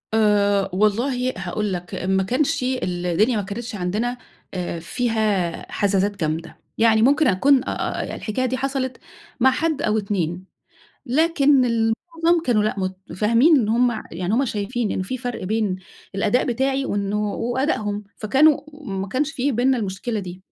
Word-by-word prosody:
آآ 205 -2 +3
والله 245 +6 +1
هاقول 195 +2 -2
لك، 180 0 -5
ما 190 +1 0
كانش 255 +6 0
الدنيا 195 -3 0
ما - - 0
كانتش 220 +4 -6
عندنا 210 +7 -2 0.4
آآ 175 -2 -3
فيها 210 -2 -1
حزازات 200 0 0
جامدة 160 +1 -3 0.2
يعني. 220 -1 +4
ممكن 285 +6 +4
أكون 260 +8 +4
آآ - - -2
هي - - -5
الحكاية 240 +4 -2
دي 260 +1 -1
حصلت 265 -1 -2 0.4
مع 265 +2 +5
حد 315 +1 -1
أو 215 -3 +1
2، 185 -4 -2 0.6
لكن 285 -1 +3
المعظم 325 +10 +1
كانوا 220 -4 +3
لأ 215 - 0
متفاهمين 210 - +2
إن 215 -3 0
هُم 235 0 +2
يعني 180 +4 -2
هُم 265 +4 +2
شايفين 220 0 -2
إنّ - - -1
في 225 +8 -4
فرق 245 -3 -5
بين 210 -1 0 0.4
الأداء 205 +5 +2
بتاعي 265 +2 0
وإنّه 205 0 -1
وأدائهم، 230 -5 -1
فكانوا 275 +8 +4 0.2
ما 195 -5 -4
كانش 280 +8 -1
في 280 -1 0
بيننا 255 +2 +2
المشكلة 210 +2 -3
دي. 185 -1 -8
220 Hz, 150 wpm, -22 LUFS, 195-255 Hz, 0.6 s, مع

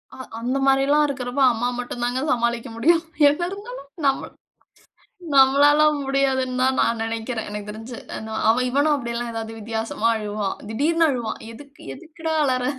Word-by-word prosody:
அ - - -13 0.2
அந்த 250 +3 -1
மாரில்லாம் 275 +2 +4
இருக்கிறப்போ 260 -1 -3
அம்மா 235 +1 -1
மட்டும் 245 0 -5
தாங்க 245 +2 -1
சமாளிக்க 235 +1 0
முடியும். 330 +6 +3 0.3
என்ன 295 +4 -2
இருந்தாலும் 405 - -9 0.2
நம்ம 270 0 +1 1.1
நம்மளால 285 +3 +6 0.2
முடியாதுன்னு 265 -2 0
தான் 260 0 +2
நான் 230 -1 +1
நெனைக்கிறேன் 225 0 -4
எனக்கு 210 0 -6
தெரிஞ்சு. 225 +3 -8 0.3
ந 220 - -6 0.4
இவனும் 285 +4 +2
அப்படில்லாம் 235 -2 -4
ஏதாவது 225 0 -6
வித்தியாசமா 225 +1 -2
அழுவான். 205 -2 -3
திடீர்னு 320 +8 +2
அழுவான்."எதுக்கு? 245 +1 -6
எதுக்குடா 320 - -5
அழற?" 255 -2 0
255 Hz, 135 wpm, -22 LUFS, 230-280 Hz, 1.1 s, நம்மளால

